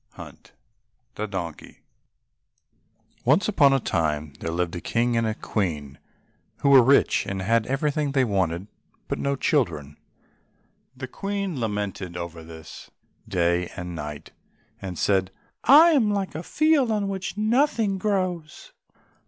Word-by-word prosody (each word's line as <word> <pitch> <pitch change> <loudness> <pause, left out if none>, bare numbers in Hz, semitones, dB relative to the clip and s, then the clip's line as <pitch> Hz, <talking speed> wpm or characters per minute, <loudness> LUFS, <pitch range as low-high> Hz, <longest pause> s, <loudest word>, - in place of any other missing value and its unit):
144 - - -13 0.6
The 110 - -4
Donkey 85 -5 -6 1.4
Once 150 +10 +3
on 145 -9 +5
a 135 - +3
time 75 - -1
there 80 - -4
lived 85 +1 -2
a 85 - -5
King 120 +1 0
and 115 -1 +1
a 110 - -2
Queen, 75 -12 -3 0.6
who 140 - +3
were 135 -2 +9
rich, 135 +4 +3
and 95 -1 -3
had 115 +2 +1
everything 145 +2 0
they 135 -1 +2
wanted, 95 -5 -1 0.4
but - - -3
no 140 0 0
children. 75 - -1 1.0
The 130 0 -6
Queen 195 0 -4
lamented 105 -5 -3
over 85 -1 -7
this 80 -1 -11 0.4
day 85 -3 0
and 90 0 -6
night, 75 -2 -7 0.5
and 95 -3 -6
said, 95 0 +1 0.4
"I 315 +6 +8
am 240 -9 +3
like 200 -4 -2
a 155 - -5
field 305 - +2
on 210 -2 0
which 190 0 -4
nothing 220 -3 +1
grows." 185 -6 -2
115 Hz, 135 wpm, -24 LUFS, -, 1.4 s, were